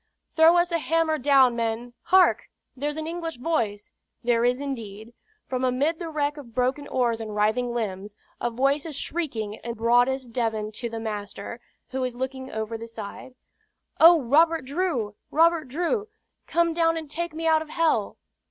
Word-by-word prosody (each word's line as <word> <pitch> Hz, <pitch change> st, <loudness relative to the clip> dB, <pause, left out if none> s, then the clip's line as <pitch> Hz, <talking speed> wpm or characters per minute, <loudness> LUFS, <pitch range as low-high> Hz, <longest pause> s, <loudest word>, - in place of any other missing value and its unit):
"Throw 325 Hz, +2 st, +6 dB
us 345 Hz, 0 st, +2 dB
a 335 Hz, -, +1 dB
hammer 320 Hz, 0 st, +1 dB
down, 265 Hz, -3 st, +5 dB
men. 230 Hz, +1 st, -2 dB
Hark! 370 Hz, +1 st, +4 dB, 0.3 s
there's 295 Hz, +3 st, -3 dB
an 315 Hz, -, -3 dB
English 330 Hz, -2 st, -4 dB
voice!" 230 Hz, -8 st, -2 dB, 0.3 s
There 235 Hz, -1 st, +2 dB
is 245 Hz, +1 st, +2 dB
indeed. 230 Hz, -5 st, -6 dB, 0.3 s
From 255 Hz, 0 st, -3 dB
amid 275 Hz, +6 st, +1 dB
the 340 Hz, -2 st, -5 dB
wreck 295 Hz, -1 st, -1 dB
of 240 Hz, -6 st, -11 dB
broken 260 Hz, +3 st, 0 dB
oars 235 Hz, -3 st, 0 dB
and 215 Hz, -2 st, -6 dB
writhing 220 Hz, +4 st, +1 dB
limbs, 205 Hz, -3 st, -4 dB, 0.2 s
a -, -, 0 dB
voice 275 Hz, +6 st, +1 dB
is 310 Hz, -, -7 dB
shrieking 235 Hz, -10 st, -3 dB
in 235 Hz, -, -4 dB
broadest 245 Hz, +2 st, +2 dB
Devon 220 Hz, -3 st, -1 dB
to 235 Hz, +2 st, -5 dB
the 225 Hz, 0 st, -5 dB
master, 210 Hz, 0 st, -6 dB, 0.3 s
who 265 Hz, 0 st, -2 dB
is 250 Hz, -1 st, -3 dB
looking 260 Hz, +1 st, -4 dB
over 220 Hz, +1 st, -4 dB
the 230 Hz, -, -7 dB
side: 225 Hz, +3 st, -9 dB, 0.6 s
"Oh, 335 Hz, +1 st, +8 dB
Robert 315 Hz, +3 st, +3 dB
Drew! 275 Hz, -, -1 dB, 0.2 s
Robert 330 Hz, -1 st, +3 dB
Drew! 355 Hz, -, -1 dB, 0.4 s
Come 335 Hz, 0 st, +2 dB
down 330 Hz, 0 st, +2 dB
and 320 Hz, -1 st, -5 dB
take 330 Hz, +2 st, -4 dB
me 325 Hz, +1 st, -4 dB
out 320 Hz, -1 st, +4 dB
of 315 Hz, -, -8 dB
hell!" 315 Hz, -11 st, +1 dB
260 Hz, 170 wpm, -25 LUFS, 230-320 Hz, 0.6 s, Oh